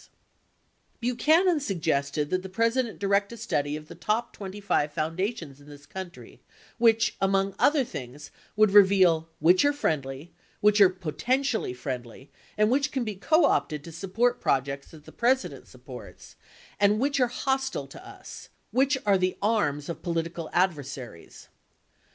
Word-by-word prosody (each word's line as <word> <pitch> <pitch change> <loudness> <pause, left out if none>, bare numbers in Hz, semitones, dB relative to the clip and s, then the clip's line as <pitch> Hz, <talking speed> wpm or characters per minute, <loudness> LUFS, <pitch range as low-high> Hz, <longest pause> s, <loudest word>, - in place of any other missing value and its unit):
142 245 +1 0
Buchanan 330 +5 +3
suggested 155 - -1
that 185 - +1
the 190 - -8
President 230 +4 0
direct 200 +1 +1
a 235 - -8
study 145 -10 -2
of 155 0 -9
the - - -10
top 225 +3 -2
25 195 -6 -2
foundations 165 - -3
in 145 - -16
this 145 0 -13
country, 185 +2 -10 0.4
which 225 -1 +3
among 195 0 +1
other 290 -1 +4
things, 140 - -9 0.2
would 215 -1 +4
reveal 190 -5 +5
"which 175 +4 +4
are 290 - +4
friendly, 150 - -3 0.3
which 210 0 +4
are 195 - +8
potentially 220 - -1
friendly, 125 0 -7 0.3
which 260 +7 +2
can 265 -2 -1
be 215 -2 -3
co 310 - +3
opted 150 - 0
to 165 - -10
support 225 +9 -1
projects 140 +1 -1
that 155 -2 -15
the - - -12
President 260 +3 0
supports, - - -12 0.4
and 205 +1 +3
which 280 +2 0
are 250 - +4
hostile 265 +2 -2
to - - -13
us; - - -11 0.2
which 270 +2 +2
are 200 -2 +3
the 185 0 0
arms 170 -10 0
of 170 - -6
political 165 -1 -3
adversaries." 140 - -3
195 Hz, 150 wpm, -26 LUFS, 155-235 Hz, 0.4 s, are